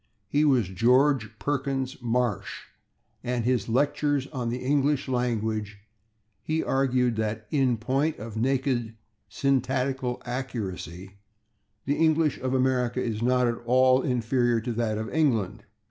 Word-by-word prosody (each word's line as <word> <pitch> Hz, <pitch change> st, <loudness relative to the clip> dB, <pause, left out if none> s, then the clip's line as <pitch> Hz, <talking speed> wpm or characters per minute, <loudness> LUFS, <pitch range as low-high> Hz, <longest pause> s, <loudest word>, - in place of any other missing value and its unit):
He 145 Hz, +8 st, +2 dB
was 130 Hz, -9 st, +3 dB
George 120 Hz, +2 st, +2 dB
Perkins 135 Hz, +2 st, -2 dB
Marsh, 120 Hz, -3 st, -1 dB, 0.6 s
and 125 Hz, -1 st, -1 dB
in 125 Hz, -, +3 dB
his 120 Hz, -3 st, -1 dB
"Lectures 145 Hz, +2 st, +1 dB
on 125 Hz, -3 st, -2 dB
the 120 Hz, -, -2 dB
English 140 Hz, +2 st, +1 dB
Language" 110 Hz, -4 st, -1 dB, 0.6 s
he 160 Hz, +1 st, -1 dB
argued 125 Hz, -3 st, +1 dB
that 110 Hz, 0 st, -2 dB
"in 130 Hz, -5 st, +2 dB
point 135 Hz, +7 st, 0 dB
of 110 Hz, 0 st, -8 dB
naked 125 Hz, -1 st, 0 dB, 0.3 s
syntactical 130 Hz, -1 st, 0 dB
accuracy, 100 Hz, -, -5 dB, 0.7 s
the 145 Hz, +2 st, 0 dB
English 160 Hz, -2 st, +2 dB
of 130 Hz, +1 st, -1 dB
America 130 Hz, -1 st, +1 dB
is 115 Hz, -3 st, -2 dB
not 125 Hz, +1 st, +3 dB
at 115 Hz, -1 st, -2 dB
all 130 Hz, +1 st, +5 dB
inferior 120 Hz, -1 st, +1 dB
to 120 Hz, +1 st, -3 dB
that 110 Hz, -2 st, -1 dB
of 110 Hz, +1 st, -3 dB
England." 115 Hz, -, 0 dB
125 Hz, 130 wpm, -26 LUFS, 115-135 Hz, 0.7 s, all